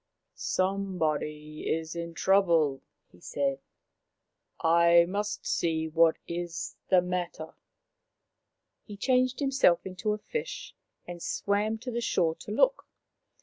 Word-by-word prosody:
Some 195 0 -1
body 150 -1 -2
is 160 +1 -2
in 170 0 -5
trouble/' 170 -8 +3 0.3
he - - -19
said. 275 - -2 0.6
" - - -52
I 170 +1 +5
must 205 +3 -3
see 160 -1 0
what 160 +1 +4
is 170 -1 -4
the 185 -2 +5
matter." 180 -3 -4 1.3
He 205 -2 -8
changed 255 +3 +2
himself 270 -11 +3
into 190 +3 -2
a - - -3
fish 470 - -5 0.3
and 175 -1 -8
swam 205 +5 0
to 250 +1 -5
the 235 0 -2
shore 170 -8 +1
to - - -9
look. - - +2
180 Hz, 125 wpm, -29 LUFS, 165-210 Hz, 1.3 s, I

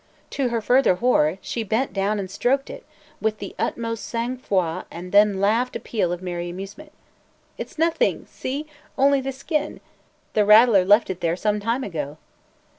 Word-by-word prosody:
To 270 -3 0
her 230 -1 -1
further 250 -3 +4
horror, 185 -7 +2
she 235 - -4
bent 220 +2 -1
down 200 +2 0
and 190 -2 -5
stroked 265 +7 0
it - - -11 0.3
with 215 0 0
the 200 - -7
utmost 230 -1 -2
sang 235 +2 -3
froid 185 -8 -1
and 180 +2 -8
then 205 -1 +4
laughed 225 +6 +1
a - - -2
peal 195 -7 -1
of 175 +1 -4
merry 175 -1 -4
amusement. 195 - -9 0.7
"It - - -5
's - - -19
nothing! 335 +10 +1
See? 280 +4 -5 0.3
Only 275 0 +4
the 270 +1 -3
skin! 295 +3 -3 0.5
The 210 - +3
rattler 210 -1 +7
left 205 +2 +4
it 180 -1 -7
there 165 0 +1
some 210 +2 0
time 230 +5 -1
ago!" 150 - -5
215 Hz, 180 wpm, -23 LUFS, 185-250 Hz, 0.7 s, rattler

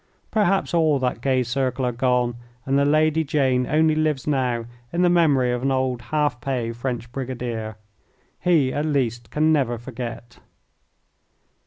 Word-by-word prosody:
Perhaps 195 -4 +1
all 160 -4 +3
that 125 -3 -2
gay 130 -1 +2
circle 130 +1 -1
are 125 - +1
gone 125 -1 +1 0.3
and 135 - 0
the 140 0 +3
Lady 155 +2 +3
Jane 130 -4 +1
only 155 +1 +3
lives 155 -3 0
now 125 -5 0 0.3
in 175 +1 +1
the 175 - +4
memory 145 -8 +3
of 125 0 -2
an 135 - 0
old 130 -2 0
half 145 -4 -1
pay 120 -3 -2
French 120 0 -4
brigadier. 120 -4 -4 0.6
He 155 -7 +2
at 145 - -1
least 120 -6 -1
can 155 +4 +2
never 125 -5 +1
forget. 120 -1 -8
130 Hz, 155 wpm, -23 LUFS, 120-150 Hz, 0.6 s, the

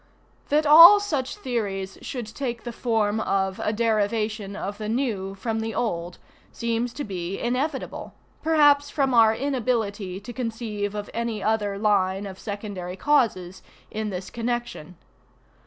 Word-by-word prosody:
That 300 +2 +3
all 335 +7 +10
such 295 -11 -2
theories 200 -6 -3
should 245 -4 -5
take 235 +1 -5
the 240 - -5
form 220 -3 0
of 190 -3 -1
a - - +1
derivation 215 -2 0
of 205 0 -5
the 215 0 -4
new 215 -6 -2
from 220 +3 -3
the 225 0 -4
old 175 -6 -2 0.3
seems 235 +1 -2
to 290 - -4
be 185 -3 -4
inevitable, 265 +4 -3 0.3
perhaps 290 -3 +4
from 275 -3 0
our 225 -2 +6
inability 220 -8 -2
to 215 +4 -9
conceive 220 -4 -4
of 205 -1 -5
any 230 -2 -3
other 210 -2 0
line 200 -2 +1
of 190 -1 -8
secondary 200 -4 -6
causes, 190 -9 +1 0.3
in 215 0 -3
this 185 0 -6
connection. 235 -8 -4
220 Hz, 140 wpm, -25 LUFS, 200-245 Hz, 0.3 s, all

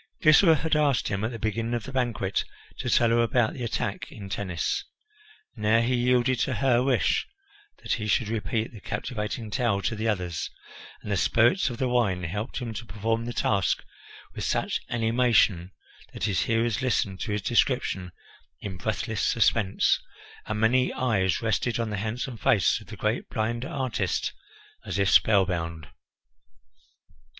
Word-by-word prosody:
Glycera 160 +2 +7
had 160 0 0
asked 145 -4 +2
him, 100 0 -2
at 110 - 0
the 120 - -6
beginning 115 +2 -2
of 120 - -3
the 135 - -8
banquet, 120 -7 -1 0.4
to - - -2
tell 120 -1 +4
her 120 0 +4
about 115 0 +2
the 125 - -6
attack 115 - -3
in 100 -2 -9
Tennis. 95 -3 -2 0.7
Now 110 0 +3
he 120 +2 +1
yielded 125 0 +2
to 130 - 0
her 125 +1 +3
wish 130 0 +1 0.6
that - - 0
he 105 -1 -2
should 110 +1 +2
repeat 110 +1 -2
the 110 - -11
captivating 110 0 -4
tale 120 -5 +1
to 110 - 0
the 110 +1 -2
others, 90 -7 -2 0.5
and 105 - -5
the 100 - +1
spirits 120 - +3
of 120 - -6
the 130 - 0
wine 110 -7 +1
helped 105 +8 -4
him 120 -4 -4
to 115 +2 -6
perform 115 +3 -1
the 120 - -3
task 100 -7 +1 0.5
with - - -5
such - - -1
animation 115 -6 +2 0.4
that - - -7
his 100 -4 +1
hearers 115 0 +1
listened 105 -7 0
to - - -3
his 105 -1 -2
description 120 -7 +1 0.5
in 95 -3 -6
breathless 110 +2 -2
suspense, 110 -3 +2 0.5
and 110 -1 -2
many 125 +3 +3
eyes 105 -6 0
rested 115 +2 0
on 115 -2 -2
the 105 - -2
handsome 115 +4 -3
face 100 -4 +2
of - - -15
the - - -9
great - - -1
blind 115 +2 -2
artist 130 -9 -2 0.5
as - - -4
if 100 -1 +2
spellbound. 85 - +2
115 Hz, 165 wpm, -26 LUFS, 100-120 Hz, 0.7 s, Glycera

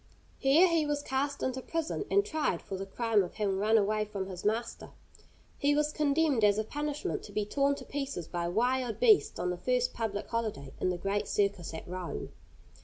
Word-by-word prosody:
Here 290 +7 +6
he 335 -2 +2
was 295 -1 -1
cast 280 +1 -1
into 260 0 -1
prison 330 +7 -2
and 400 +1 +3
tried 310 - -1
for 195 - -5
the 195 +1 -5
crime 225 +1 +2
of 180 - -5
having 195 -3 0
run 220 +2 +4
away 215 +1 +2
from 205 -2 -4
his 185 -2 -7
master. 225 +3 -2 0.7
He 290 +1 +3
was 300 0 +1
condemned 295 -4 +2
as 205 0 +5
a 215 - +1
punishment 295 +5 -3
to 205 - -11
be 210 0 -1
torn 280 +5 +1
to - - -9
pieces 275 - -4
by 175 -1 -2
wild 245 +5 0
beasts 440 -5 +5
on 180 0 -1
the 180 - -3
first 250 +5 0
public 215 -3 -3
holiday, 210 - -3
in - - +1
the 180 - -1
great 195 +3 -1
circus 200 -4 0
at - - -8
Rome. 180 0 -5
225 Hz, 200 wpm, -30 LUFS, 195-285 Hz, 0.7 s, Here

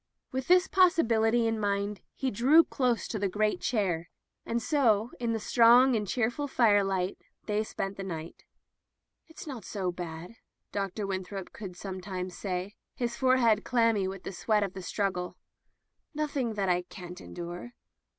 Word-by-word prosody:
With 260 0 -3
this 360 +1 +5
possibility 235 -11 +3
in 225 -1 0
mind 200 0 -1
he 265 -1 -1
drew 275 +10 +6
close 250 -6 0
to 215 - -3
the 200 -1 0
great 210 +2 0
chair 180 -8 0 0.2
— - - -56
and 235 - 0
so, 235 -5 +2
in 235 -1 -1
the 225 - -1
strong 240 +4 +6
and 210 -2 -1
cheerful 245 +7 -1
fire 215 -6 +4
light, 190 -1 -1 0.3
they 210 0 0
spent 195 -2 -4
the 195 - -4
night. 165 -3 -7 0.8
"It's 320 - -11
not 260 -8 -7
so 185 -1 -2
bad,'* 175 +4 -7 0.3
Dr. 200 +1 -2
Winthrop 190 0 -5
would 185 -4 -6
sometimes 185 -1 -5
say, 185 +1 -4 0.2
his 235 -1 -2
forehead 250 -5 +3
clammy 230 -5 +2
with 190 -1 -6
the - - -5
sweat 210 +3 +1
of 195 -2 -3
the 190 - -7
struggle. 185 -2 -2 0.8
"Nothing 280 -7 -1
that 200 -2 0
I 180 -1 +2
can't 180 0 -10
endure." 175 +7 -7
210 Hz, 160 wpm, -29 LUFS, 190-240 Hz, 0.8 s, drew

